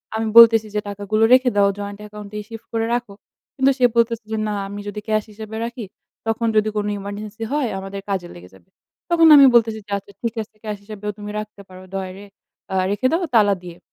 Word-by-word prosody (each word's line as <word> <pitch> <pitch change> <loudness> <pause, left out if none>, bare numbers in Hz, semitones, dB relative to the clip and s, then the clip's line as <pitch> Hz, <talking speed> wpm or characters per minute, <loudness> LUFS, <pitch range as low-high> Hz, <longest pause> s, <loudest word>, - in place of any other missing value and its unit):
আমি 220 0 -1
বলতেছি 225 -2 +8
যে, - - +2
"টাকাগুলো 205 +2 -1
রেখে 255 0 +5
দাও, 200 -1 +4
জয়েন্ট 205 0 -6
অ্যাকাউন্ট 210 -1 -10
এ - - -3
শিফট 225 0 -10
করে 225 0 0
রাখো।" 240 -4 -2 0.4
কিন্তু 270 0 +3
সে 250 - +4
বলতেছে 230 -1 +2
যে, 220 - -1
"না 210 - -2
আমি 200 +1 -7
যদি 210 +1 -5
ক্যাশ 215 -1 +1
হিসেবে 220 +1 -9
রাখি, 235 -1 -6 0.4
তখন 225 +1 0
যদি 215 0 +3
কোনো 210 0 -1
ইমারজেন্সি 205 +2 -7
হয় 290 -4 0
আমাদের 195 +1 -7
কাজে 185 -3 -2
লেগে 90 +1 -13
যাবে।" 130 - -21 0.4
তখন 330 -1 +5
আমি 280 -1 +9
বলতেছি 225 -2 +3
যে, 205 - -14
"আচ্ছা 200 0 -12
ঠিক 230 -2 -2
আছে 215 - -23
ক্যাশ 210 -1 -3
হিসাবেও 210 0 -6
তুমি 210 0 -7
রাখতে 215 -1 -9
পারো। 185 0 -12
ড্রয়ারে 190 +1 -6 0.5
আ - - -1 0.2
রেখে 205 +6 +1
দাও 335 +3 +1
তালা 205 -3 +5
দিয়ে।" 175 -1 -10
215 Hz, 210 wpm, -21 LUFS, 200-230 Hz, 0.5 s, আমি